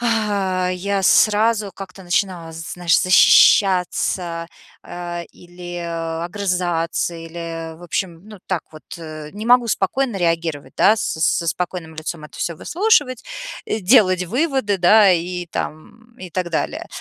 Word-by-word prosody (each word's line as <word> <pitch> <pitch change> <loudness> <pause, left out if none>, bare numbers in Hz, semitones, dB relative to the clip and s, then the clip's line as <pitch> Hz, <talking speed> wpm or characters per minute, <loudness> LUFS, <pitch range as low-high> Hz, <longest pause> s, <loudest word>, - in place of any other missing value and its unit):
я 200 -4 0
сразу 215 0 +3
как-то 190 -1 -10
начинала, 175 -2 -1
знаешь, 165 +1 0
защищаться, 180 -2 +4 0.4
а, 175 -1 -6
или 175 0 -11 0.5
огрызаться, 175 -3 -1
или, 165 0 -7
в 175 - -16
общем, 175 -1 -3
ну, 210 -3 -11
так 180 -4 -2
вот, 155 -1 -14
э, 155 -2 -9
не 210 +2 -7
могу 245 0 +5
спокойно 230 +4 0
реагировать, 165 -4 -2
да, 215 - +5
с - - -2 0.2
с 160 - +2
со 170 - -2
спокойным 175 -2 -4
лицом 160 0 -5
это 150 - -12
всё 170 - -2
выслушивать, 345 - +1 0.4
делать 195 -3 +3
выводы, 250 - 0
да, 200 +3 +6
и 175 +1 -2
там, 225 +9 -7
и 185 -2 -10
так 180 0 -3
далее. 165 - -2
180 Hz, 130 wpm, -20 LUFS, 170-205 Hz, 0.5 s, да